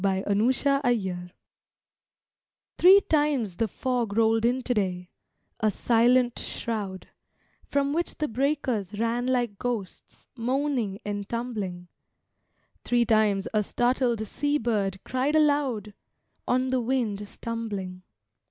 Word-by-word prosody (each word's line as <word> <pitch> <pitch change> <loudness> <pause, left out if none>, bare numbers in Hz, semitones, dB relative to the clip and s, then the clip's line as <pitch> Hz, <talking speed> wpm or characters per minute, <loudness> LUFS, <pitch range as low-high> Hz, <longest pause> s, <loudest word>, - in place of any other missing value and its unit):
IMPERTURBABLE 205 -1 +1 1.5
Three 380 +3 +8
times 290 - 0
the 225 - +1
fog 235 -1 -2
rolled 225 0 +3
in 250 +2 +1
today, 185 -7 -1 0.5
a 215 -1 +2
silent 240 +3 +3
shroud, 205 -5 -4 0.6
From 280 0 0
which 340 +2 -1
the 305 - -1
breakers 245 -6 -1
ran 230 +2 0
like 240 -5 0
ghosts, 235 -6 -5
moaning 250 -4 -1
and 205 -1 -4
tumbling. 210 -7 -4 1.0
Three 240 -1 +2
times 215 -3 +2
a 215 - +3
startled 240 0 0
sea 290 +7 0
bird 205 -6 -1
cried 260 +4 0
aloud, 285 -9 +1 0.5
On 255 +1 +1
the 260 -1 +1
wind 225 -5 -1
stumbling. 205 -5 -5
230 Hz, 105 wpm, -26 LUFS, 205-255 Hz, 1.5 s, Three